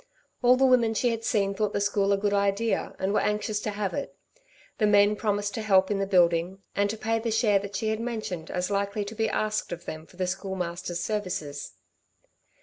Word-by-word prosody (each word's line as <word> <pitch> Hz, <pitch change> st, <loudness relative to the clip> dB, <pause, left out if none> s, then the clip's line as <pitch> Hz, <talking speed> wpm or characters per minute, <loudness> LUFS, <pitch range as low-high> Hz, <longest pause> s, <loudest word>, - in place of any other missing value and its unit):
All 250 Hz, 0 st, +6 dB
the 265 Hz, +1 st, +3 dB
women 240 Hz, -4 st, +4 dB
she 245 Hz, -, +2 dB
had 230 Hz, 0 st, -4 dB
seen 200 Hz, -3 st, +1 dB
thought 210 Hz, 0 st, -1 dB
the -, -, 0 dB
school 200 Hz, 0 st, +1 dB
a 200 Hz, -, +3 dB
good 205 Hz, 0 st, 0 dB
idea 200 Hz, +3 st, 0 dB
and 190 Hz, +1 st, -1 dB
were -, -, +3 dB
anxious 210 Hz, 0 st, -1 dB
to 215 Hz, -, -3 dB
have 205 Hz, -2 st, -2 dB
it; 285 Hz, -, -5 dB, 0.6 s
the 215 Hz, -, +4 dB
men 205 Hz, 0 st, +6 dB
had 210 Hz, -, -3 dB
promised 205 Hz, -1 st, 0 dB
to 225 Hz, -, -3 dB
help 190 Hz, -2 st, +3 dB
in 200 Hz, -, 0 dB
the 195 Hz, -, 0 dB
building, 175 Hz, 0 st, +3 dB, 0.2 s
and 200 Hz, 0 st, +2 dB
to 220 Hz, -, -3 dB
pay 225 Hz, +1 st, 0 dB
the 230 Hz, +1 st, -2 dB
share 215 Hz, -2 st, +3 dB
that 200 Hz, 0 st, -7 dB
she 220 Hz, -, -1 dB
had 220 Hz, 0 st, -1 dB
mentioned 220 Hz, -8 st, -4 dB
as 180 Hz, +2 st, -2 dB
likely 200 Hz, +1 st, -1 dB
to 205 Hz, -, -7 dB
be 220 Hz, 0 st, 0 dB
asked 215 Hz, 0 st, -1 dB
of 175 Hz, 0 st, -6 dB
them 155 Hz, 0 st, -7 dB
for 175 Hz, -, -19 dB
the 185 Hz, -, 0 dB
Schoolmaster's 180 Hz, -2 st, -3 dB
services. 180 Hz, -9 st, -3 dB
205 Hz, 225 wpm, -27 LUFS, 190-215 Hz, 0.6 s, All